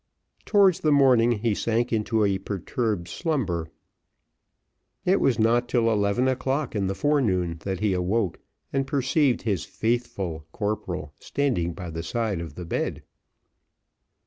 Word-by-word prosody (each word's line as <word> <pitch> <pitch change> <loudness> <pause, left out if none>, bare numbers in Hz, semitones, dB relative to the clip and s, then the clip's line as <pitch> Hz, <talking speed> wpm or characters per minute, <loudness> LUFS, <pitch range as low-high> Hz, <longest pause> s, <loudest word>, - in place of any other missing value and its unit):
Towards 195 -4 +4
the 155 - +2
morning, 130 -5 +5
he 110 0 0
sank 115 +3 0
into 110 0 +1
a 100 -1 +1
perturbed 100 0 -2
slumber. 95 - -2 1.4
It 185 +2 +4
was 130 -5 +3
not 120 +2 +2
till 115 -2 +2
eleven 105 +4 +2
o'clock 135 +1 -1
in 100 -2 0
the 95 - -2
forenoon 95 - +1
that 95 -1 -2
he 105 -3 +2
awoke 95 +1 0 0.3
and 135 0 0
perceived 135 -2 +1
his 100 -8 0
faithful 100 -9 -2
corporal 90 -8 -3
standing 120 -12 -1
by 85 0 -7
the 80 +1 -4
side 105 +1 -2
of 85 - -8
the 90 - -6
bed. - - -2
110 Hz, 140 wpm, -25 LUFS, 95-130 Hz, 1.4 s, morning